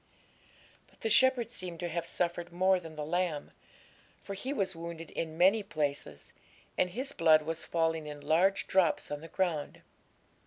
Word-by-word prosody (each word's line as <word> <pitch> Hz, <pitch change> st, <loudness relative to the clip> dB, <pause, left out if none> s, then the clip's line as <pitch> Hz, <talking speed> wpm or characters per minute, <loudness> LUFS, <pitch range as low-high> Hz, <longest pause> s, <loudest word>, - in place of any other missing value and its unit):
But -, -, -27 dB
the 225 Hz, -, -1 dB
shepherd 245 Hz, 0 st, +4 dB
seemed 180 Hz, -7 st, -4 dB
to 175 Hz, -, -1 dB
have 170 Hz, 0 st, -3 dB
suffered 175 Hz, 0 st, -2 dB
more 185 Hz, +2 st, +3 dB
than 165 Hz, -2 st, -10 dB
the 150 Hz, -1 st, -4 dB
lamb, 170 Hz, -2 st, -1 dB, 0.7 s
for 200 Hz, -, -6 dB
he 250 Hz, +8 st, -4 dB
was 195 Hz, -9 st, -1 dB
wounded 165 Hz, -1 st, -7 dB
in 160 Hz, -1 st, -4 dB
many 195 Hz, +5 st, +5 dB
places, 145 Hz, -, -3 dB, 0.4 s
and 180 Hz, -, +2 dB
his 260 Hz, +9 st, -3 dB
blood 160 Hz, -, +5 dB
was 165 Hz, +1 st, -3 dB
falling 165 Hz, -2 st, 0 dB
in 150 Hz, -1 st, -7 dB
large 170 Hz, +7 st, +2 dB
drops 185 Hz, -5 st, +2 dB
on 145 Hz, 0 st, -4 dB
the 165 Hz, -, -9 dB
ground. 165 Hz, -5 st, -2 dB
170 Hz, 165 wpm, -31 LUFS, 160-190 Hz, 0.7 s, many